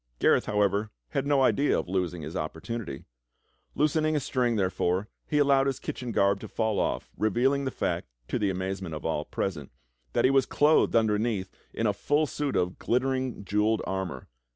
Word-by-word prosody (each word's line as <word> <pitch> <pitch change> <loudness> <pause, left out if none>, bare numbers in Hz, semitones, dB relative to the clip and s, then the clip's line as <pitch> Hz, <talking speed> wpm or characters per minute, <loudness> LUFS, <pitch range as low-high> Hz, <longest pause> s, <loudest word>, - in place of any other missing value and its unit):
Gareth, - - +3
however, 105 0 +1 0.2
had 140 - -1
no 140 -2 +4
idea 140 +2 +3
of - - -3
losing 90 -3 -2
his 80 +4 -7
opportunity. 80 - -5 0.7
Loosen 155 +1 +2
ing 155 0 +1
a - - +3
string, 125 -3 0
therefore, 95 0 0 0.2
he 150 - 0
allowed 140 -2 +4
his 135 -2 0
kitchen 125 -2 -5
garb 100 -2 +2
to - - -8
fall 110 -2 -1
off, - - -1
revealing 130 +6 +2
the - - 0
fact, - - -2 0.2
to - - -1
the 100 - +1
amazement 95 -2 -3
of 75 - -7
all 80 -2 0
present, 80 -8 -3 0.4
that - - +3
he 130 - +5
was 135 -1 +3
clothed 150 -3 +3
under 110 -2 +3
neath 105 -5 -1 0.2
in 115 - -2
a 105 - +3
full 145 +9 +1
suit 145 -1 -3
of 90 0 0
glittering, 130 -3 -1
jewelled 105 +3 +1
armor. 95 -9 -4
110 Hz, 185 wpm, -28 LUFS, 95-135 Hz, 0.7 s, he